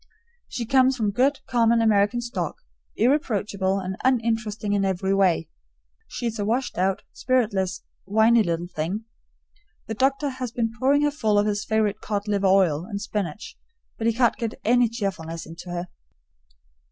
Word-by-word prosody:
She 235 - -4
comes 260 +2 +3
from 215 -3 0
good 270 +6 +1
common 235 -1 +3
American 220 +1 +3
stock, 240 +1 -3 0.4
irreproachable 205 -7 +1
and 190 0 -5
uninteresting 225 -4 0
in 200 -1 +1
every 190 0 0
way. 185 -5 +2 0.6
She's 230 -2 -4
a - - 0
washed 235 0 -1
out, 190 +1 0
spiritless, 200 -7 0 0.2
whiney 220 +3 +5
little 170 -3 -1
thing. 180 +6 -4 0.8
The 220 - -4
doctor 270 +5 +1
has 255 -3 -5
been 230 -1 -1
pouring 280 +3 +3
her 295 - +2
full 220 -8 +1
of 205 - +3
his 210 0 -1
favorite 215 -1 0
cod 205 -1 -3
liver 200 -2 +1
oil 185 -5 +3
and 200 +1 -5
spinach, 205 0 -5 0.4
but 225 - 0
he 230 - +3
can't 240 0 +2
get 230 -2 -3
any 245 +1 +4
cheerfulness 185 -7 -4
into 165 +2 -10
her. 175 +1 -4
215 Hz, 155 wpm, -24 LUFS, 195-235 Hz, 0.8 s, whiney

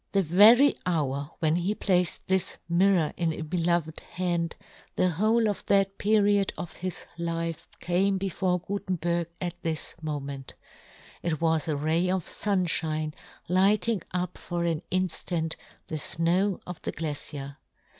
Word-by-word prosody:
The 195 -1 +3
very 215 - +7
hour 145 -5 -1
when 160 0 +3
he 185 +4 0
placed 180 -4 0
this 190 -1 +1
mirror 175 -2 +3
in 170 -2 +1
a 160 - -5
beloved 170 -1 0
hand, 170 -2 -2 0.4
the 185 - +2
whole 220 +6 +2
of 205 - -2
that 195 -1 +2
period 205 -2 +3
of 170 - -6
his 185 -1 -5
life 165 -1 -3
came 190 +3 +1
before 185 -1 0
Gutenberg 175 -3 -2
at 175 -1 -5
this 160 -2 -1
moment; 140 -3 -5 0.7
it 165 -3 -1
was 160 -1 +1
a 155 - 0
ray 160 +5 +1
of 185 -2 0
funfhine 165 -6 0 0.3
lighting 195 +3 +3
up 180 0 -3
for 175 -1 -3
an 165 -2 0
inftant 175 -3 -1 0.3
the 155 - -4
fnow 170 +6 +1
of 180 -2 -8
the - - -3
glacier. 145 -2 -4
175 Hz, 140 wpm, -27 LUFS, 160-190 Hz, 0.7 s, very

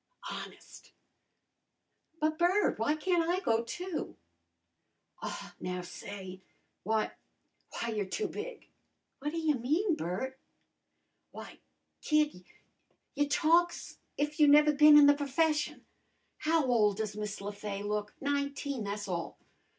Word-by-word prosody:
"Honest!" - - -10 1.3
"But, 310 0 0
Bert, 360 - +2
w'y 260 +7 +2
can't 340 -1 +1
I 360 +1 +2
go, 230 -10 +1
too?" 350 +8 -5 1.1
"Aw, - - -6
now, 180 0 -4
say 190 +1 -8 0.4
w'y 220 +2 0 0.6
w'y, 230 -1 -3
you're 205 -2 -1
too 420 - -2
big!" - - -7 0.5
"What 290 +2 -2
ta 330 - -5
y' 320 -2 +2
mean, 310 - +1
Bert?" 260 - -4 1.0
"W'y, - - -10 0.4
kid, 300 - +1 0.7
you 290 0 0
talk's 340 +3 +2 0.2
if 295 +1 -2
you 300 - +7
never 300 +1 +6
bin 300 +1 +8
in 295 - +9
the 285 - +7
p'fession. 300 +2 0 0.6
How 320 -1 +2
ole 225 -5 +3
does 215 0 -4
Miss 210 -1 -4
Le 200 +1 -4
Fay 200 -1 -5
look? 210 0 -3
Nineteen, 280 -3 -2
tha's 205 +1 -4
all. 170 -3 -4
280 Hz, 125 wpm, -31 LUFS, 210-310 Hz, 1.3 s, in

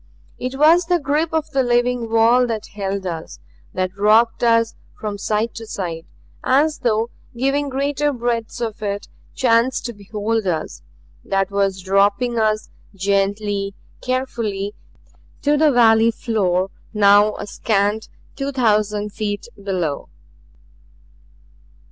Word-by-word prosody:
It 255 +1 -4
was 325 +4 +5
the 355 0 +3
grip 300 +2 0
of 315 -1 -1
the 270 - +2
living 245 -1 +1
wall 230 +2 +4
that 220 -2 -4
held 195 -1 -3
us; 165 -3 -5 0.4
that 185 0 -1
rocked 220 +4 +3
us 230 -1 +3 0.3
from 210 -2 -4
side 215 +3 -1
to 225 -1 -8
side 170 -5 -5 0.4
as 295 +4 +2
though 230 0 0 0.3
giving 275 +3 0
greater 285 +2 0
breadths 240 -2 -2
of 225 -1 -4
it 205 -1 -3 0.3
chance 240 +1 +3
to 240 - -5
behold 210 +1 -2
us; 160 - -3 0.4
that 195 0 0
was 195 -2 0
dropping 200 +5 +2
us 215 -1 0 0.2
gently, 200 +1 0 0.3
carefully, 230 -6 -2 0.7
to 295 +1 +3
the 305 0 +4
valley 225 -2 +5
floor 195 -5 0 0.2
now 205 0 +5
a - - -6
scant 205 +1 0 0.3
two 275 0 -3
thousand 210 -4 +1
feet 205 -2 -3
below. 185 -7 -3
220 Hz, 125 wpm, -20 LUFS, 200-250 Hz, 0.7 s, was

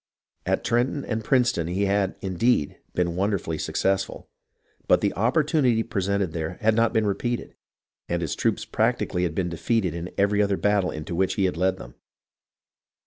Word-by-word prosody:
At - - +1
Trenton 125 +4 0
and 110 0 -2
Princeton 120 -9 +2
he 95 +4 0
had, 100 -1 +1
indeed, 95 -2 +1 0.2
been 85 -1 0
wonderfully 95 -4 -1
successful; 95 0 -1 0.6
but - - +5
the - - 0
opportunity 125 - +2
presented 100 -5 -1
there 80 +1 -3
had 110 -1 +3
not 115 +1 +3
been 110 -1 +1
repeated, 120 +4 -2 0.6
and 85 0 -1
his 80 - -2
troops - - 0
practically 90 - 0
had 85 -3 -1
been 90 -2 0
defeated 90 +2 0
in 85 +2 -5
every 100 +1 +3
other 100 -1 +1
battle 105 -3 +2
into 75 +2 -6
which 95 +2 +1
he 100 - +2
had 90 - 0
led 95 +2 +1
them. - - -11
100 Hz, 165 wpm, -25 LUFS, 90-110 Hz, 0.6 s, but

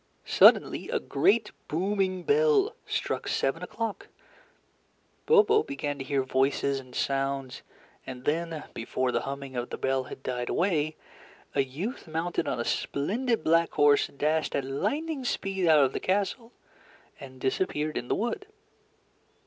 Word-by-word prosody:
Suddenly - - +5
a - - 0
great 210 +10 +2 0.2
booming 185 +2 -1
bell 445 -1 +3
struck - - -2
seven - - 0
o'clock; 220 -1 -4 1.2
Bobo 435 -1 +5
began 145 - -4
to - - -3
hear 135 0 0
voices 135 +1 +1
and 130 -1 -13
sounds; 135 -1 -1 0.5
and 125 -1 -8
then, 165 0 -1
before 125 +2 -1
the - - 0
humming 140 -1 -6
of 120 0 -3
the - - -5
bell 135 -1 0
had 130 - -10
died 125 -1 -3
away, 155 -4 +1 0.6
a 140 - +3
youth 165 - -5
mounted 165 +2 -2
on - - -1
a - - -2
splendid 225 - -1
black 165 +1 +3
horse 145 -1 +4
dashed 155 +3 -1
at 140 - -1
lightning 270 - -2
speed 195 -6 -1
out 155 -3 +6
of 130 - -2
the - - -2
castle 205 +5 -1 0.7
and 130 -2 -11
disappeared 150 +2 -1
in 120 - -3
the - - +1
wood. 240 - -3
155 Hz, 145 wpm, -28 LUFS, 135-205 Hz, 1.2 s, out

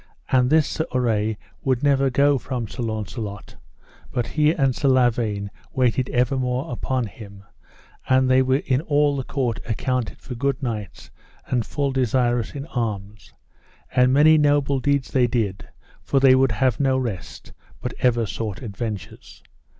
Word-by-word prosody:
And 125 -1 +4
this 155 0 +4
Sir 160 - -2
Urre 110 -3 +1 0.3
would 130 0 0
never 135 -1 +3
go 140 +2 +3
from 125 -4 -4
Sir 125 - -7
Launcelot, 110 -2 -5 0.5
but 120 - -1
he 150 -1 +2
and 135 -6 +1
Sir 150 -2 0
Lavaine 115 -6 +1 0.2
awaited 125 0 +1
evermore 125 +1 0
upon 125 0 -2
him; 100 -1 -11 0.7
and 130 0 +4
they 130 0 +4
were 130 +2 +1
in 130 0 +1
all 145 -2 +2
the 135 - -2
court 125 -4 -2
accounted 125 +1 -2
for 130 - -9
good 135 +3 -2
knights, 105 -7 -5 0.3
and 120 -4 -1
full 140 -1 -1
desirous 120 -2 0
in 140 0 -5
arms; 105 - -5 0.6
and 125 0 +4
many 155 +3 +6
noble 145 -2 +2
deeds 140 0 0
they 125 -2 +3
did, 110 -5 -2 0.3
for 135 - +1
they 135 -1 +6
would 130 -2 +3
have 120 +3 +1
no 135 -2 +2
rest, 115 -9 -5 0.3
but - - -4
ever 120 -2 +2
sought 105 0 -5
adventures. 105 -2 -7
125 Hz, 155 wpm, -23 LUFS, 115-135 Hz, 0.7 s, many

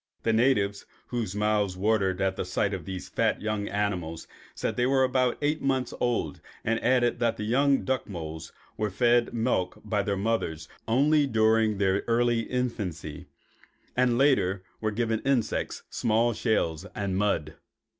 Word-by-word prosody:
The 115 - +2
natives, 110 -4 +2 0.2
whose 115 -6 -3
mouths 105 -3 +1
watered 100 -2 +1
at 95 0 +1
the - - -2
sight 100 +3 -1
of 90 -5 -5
these 95 -1 -6
fat - - 0
young 105 -1 -2
animals, 90 -6 -2 0.3
said - - -1
that - - -6
they 125 0 +2
were 135 0 +3
about 130 -1 +1
eight 150 +2 +1
months 130 -2 0
old, 120 -1 -1 0.2
and 115 +1 0
added 125 -2 +2
that 115 -1 +1
the - - -4
young 135 +5 +2
duck 130 -3 -1
moles 80 -3 -6 0.3
were 105 0 0
fed 120 +4 +2
milk 115 -6 -1
by 105 -1 0
their 100 -1 -1
mother 105 -6 -1 0.3
only 145 +5 +3
during 110 -2 +3
their 95 0 +1
early 120 0 +2
infancy 105 -11 -3 0.7
and 125 -1 +3
later 100 -9 +2 0.2
were 110 - 0
given 110 +1 -1
insects, 130 -3 -1
small 115 +2 +2
shells, 85 -9 0
and 100 -2 -2
mud. 95 -6 0
110 Hz, 160 wpm, -27 LUFS, 95-120 Hz, 0.7 s, were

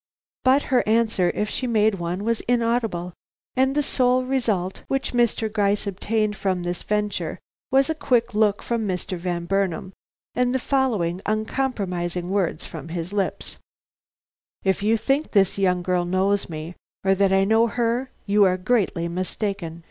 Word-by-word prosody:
But 265 +2 +4
her 250 - +5
answer, 220 -5 +2
if 210 - 0
she 255 - -3
made 215 -4 +2
one, 175 +3 -3
was 230 +1 0
inaudible, 230 -7 0 0.4
and 265 +1 +2
the 295 - +2
sole 255 -2 +2
result 220 -9 -1
which 270 -1 -1
Mr. 235 -2 +2
Gryce 205 -1 +1
obtained 210 +2 -1
from 185 -3 -1
this 175 0 -3
venture 210 -1 -2 0.3
was 270 +1 +4
a 320 - 0
quick 245 -6 +1
look 210 -1 +2
from 230 -3 -1
Mr. 185 0 -2
Van 175 -1 -3
Burnam 190 -1 -1 0.4
and 250 +1 +1
the - - +4
following 225 -10 0
uncompromising 195 -6 -2
words 190 -6 0
from 160 -2 -8
his 170 +2 -5
lips: 200 -2 -2 1.1
"If 190 0 +1
you 220 +2 +3
think 270 +7 0
this 200 -2 +3
young 180 -2 +2
girl 180 0 +1
knows 190 +3 +1
me, 160 +1 -6 0.3
or 195 0 +4
that 195 0 +2
I 195 0 +4
know 220 +3 +4
her, 240 +3 -1 0.2
you 205 0 +4
are 185 -1 +2
greatly 185 -4 0
mistaken. 185 -1 -3
205 Hz, 160 wpm, -23 LUFS, 180-235 Hz, 1.1 s, her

